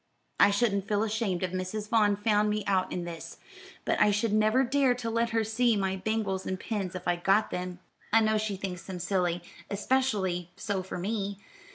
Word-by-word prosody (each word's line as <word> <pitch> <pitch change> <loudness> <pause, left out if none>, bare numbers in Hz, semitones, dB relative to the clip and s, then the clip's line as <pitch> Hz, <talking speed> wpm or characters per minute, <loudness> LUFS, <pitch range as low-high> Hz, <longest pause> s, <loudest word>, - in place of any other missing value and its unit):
"I - - +7
shouldn't 200 -2 +1
feel 210 0 +1
ashamed 210 -4 -1
if 185 - -1
Mrs. 185 +3 -3
Vaughn 210 -3 +4
found 210 0 +2
me 210 0 -1
out 190 -2 +1
in 180 - -3
this, 170 -1 -7 0.5
but - - +1
I 210 - +6
should 210 +1 +1
never 215 +4 +4
dare 265 0 +3
to 235 -2 -4
let 230 +1 +1
her 225 -1 +1
see 225 +2 +2
my 190 -1 0
bangles 195 -1 -2
and 185 0 -2
pins, 195 -5 -3
if 180 -1 -6
I 175 0 +2
got 195 +4 +2
them. 180 0 -4 0.3
I 225 - +6
know 215 0 +2
she 210 -2 -2
thinks 185 -2 -5
them 190 -2 -6
silly, 175 -1 0 0.3
especially 200 -6 0
so 195 -1 -2
for 185 - -6
me. 200 +1 -2
205 Hz, 200 wpm, -29 LUFS, 185-220 Hz, 0.5 s, I